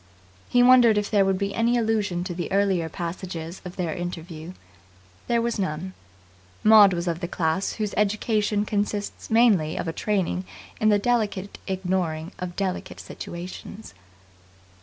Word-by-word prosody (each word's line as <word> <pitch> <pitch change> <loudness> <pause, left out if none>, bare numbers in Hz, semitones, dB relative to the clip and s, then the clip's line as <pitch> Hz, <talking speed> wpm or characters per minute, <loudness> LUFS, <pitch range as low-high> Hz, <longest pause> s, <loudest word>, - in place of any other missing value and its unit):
He 245 0 +4
wondered 245 -3 +7
if 205 0 -1
there 205 -2 +4
would 195 -1 +1
be 200 +1 -2
any 235 +1 +2
allusion 210 -6 0
to 180 - -4
the 175 0 -4
earlier 190 -4 +1
passages 170 0 -6
of 180 -1 -8
their 175 -5 -2
interview. 175 -1 -6 0.7
There 235 -1 +2
was 235 -2 -1
none. 185 0 -3 0.7
Maud 215 -2 +8
was 175 0 -2
of 170 -1 -1
the 175 - -3
class 165 +2 -1
whose 210 -2 -3
education 210 0 +1
consists 205 0 -3
mainly 215 -9 +3
of - - -3
a 165 - -2
training 175 - -1 0.3
in 215 - +3
the 205 - +5
delicate 205 -3 -1
ignoring 180 -4 -2
of 180 -1 -5
delicate 190 -2 -3
situations. 185 +5 -8
195 Hz, 150 wpm, -25 LUFS, 175-210 Hz, 0.7 s, Maud